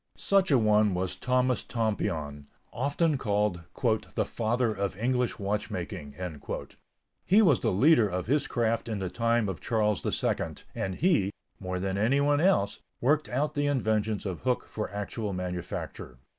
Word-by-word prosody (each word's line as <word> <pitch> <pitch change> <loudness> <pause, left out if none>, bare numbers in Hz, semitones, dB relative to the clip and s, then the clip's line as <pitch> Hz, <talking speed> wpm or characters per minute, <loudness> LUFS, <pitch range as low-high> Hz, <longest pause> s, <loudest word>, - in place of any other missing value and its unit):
Such 195 -1 +2
a 140 - +5
one 105 -3 +3
was 90 0 -2
Thomas 125 0 +1
Tompion, 80 - -2 0.3
often 145 +4 +1
called 105 -5 0 0.6
"the - - +1
father 115 0 0
of 100 -2 -3
English 125 +1 0
watchmaking." 100 -8 -4 1.1
He 210 +4 +5
was 155 - +5
the - - +1
leader 115 - +5
of 90 0 -3
his 140 +4 +1
craft 115 0 0
in 110 - -2
the 95 -2 -3
time 115 0 +1
of 95 -6 -4
Charles 105 -3 +1
II - - -1 0.2
and 95 -1 -3
he, 160 - +2 0.3
more 90 -1 -3
than 95 +1 -2
anyone 140 +6 +3
else, 165 - +2 0.2
worked 150 +4 +2
out 145 +4 0
the 145 -1 0
inventions 110 -6 0
of 95 -3 -3
Hooke 125 -1 -1
for 105 - -4
actual 105 +1 -4
manufacture. 90 -8 -5
110 Hz, 150 wpm, -28 LUFS, 95-130 Hz, 1.1 s, a